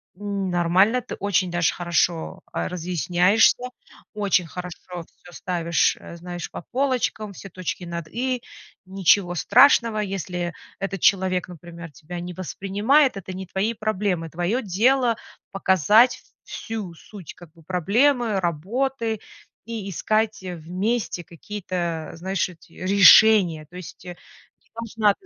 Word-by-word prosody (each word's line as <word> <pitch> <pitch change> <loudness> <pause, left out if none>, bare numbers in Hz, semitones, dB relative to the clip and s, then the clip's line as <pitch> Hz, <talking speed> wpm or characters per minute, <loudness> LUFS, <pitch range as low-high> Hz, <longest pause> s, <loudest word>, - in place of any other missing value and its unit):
"Нормально, 195 +2 +1
ты - - -7
очень 190 -2 +1
даже 175 -1 +1
хорошо, 175 +1 -1
а, - - -2
разъясняешься, 180 +6 +2 0.5
очень 200 -4 +1
хорошо 180 +1 -7 0.2
всё 175 +1 -19
ставишь, 170 -3 0
э, - - -10
знаешь, 175 0 -7
по - - -7
полочкам, 250 -5 -1
все 195 - -10
точки 185 0 -5
над 170 -2 -6
и. 250 +4 -2 0.4
Ничего 190 -1 +2
страшного, 235 - +5
если 180 -3 -3 0.3
этот 195 -2 -4
человек, 185 -2 +2
например, 170 -1 -10
тебя 170 +5 -8
не 180 +1 -6
воспринимает, 205 - +1
это 190 0 -7
не 190 +1 -6
твои 195 +5 -1
проблемы. 200 -6 -2
Твоё 175 +10 -1
дело- 235 +4 +2 0.3
показать 195 +5 +4 0.2
всю 215 -6 -6
суть, 185 +1 -11
как 175 -3 -15
бы, 165 - -20
проблемы, 215 - +2
работы 220 - -2 0.5
и 220 -3 -5
искать 215 +4 0
вместе 180 +4 -3
какие-то, 175 -2 -5
знаешь, 190 +4 -1
эти 175 -2 -17
решения". 190 -3 +6
То 180 - -16
есть, 180 +1 -11
э, 180 - -7 0.7
неважно. 215 -2 +2
190 Hz, 125 wpm, -23 LUFS, 175-215 Hz, 0.7 s, решения